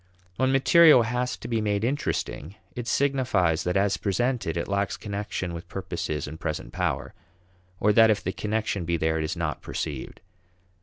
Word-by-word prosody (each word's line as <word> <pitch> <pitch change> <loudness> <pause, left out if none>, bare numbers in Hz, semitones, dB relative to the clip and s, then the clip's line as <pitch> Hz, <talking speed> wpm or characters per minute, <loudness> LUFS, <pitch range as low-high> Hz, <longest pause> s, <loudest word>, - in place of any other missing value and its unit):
When 130 +1 +2
material 140 0 +7
has 125 +2 -2
to - - -8
be 115 -2 0
made 105 -1 0
interesting, 120 - -2 0.2
it 120 -1 -5
signifies 125 - +1
that 90 +2 0
as 100 0 +2
presented, 115 -4 -1
it 85 - -2
lacks 100 -1 -1
connection 100 -3 -4
with 85 0 -7
purposes 85 -6 -4
and 80 +3 -8
present 75 -6 -4
power: - - -2 0.7
or 105 +1 +3
that 110 +1 +6
if 105 -1 +1
the 95 - -1
connection 105 -3 -2
be 85 0 0
there, 80 0 0
it - - -1
is 80 - -2
not - - -2
perceived. 75 -5 -5
100 Hz, 170 wpm, -26 LUFS, 85-120 Hz, 0.7 s, material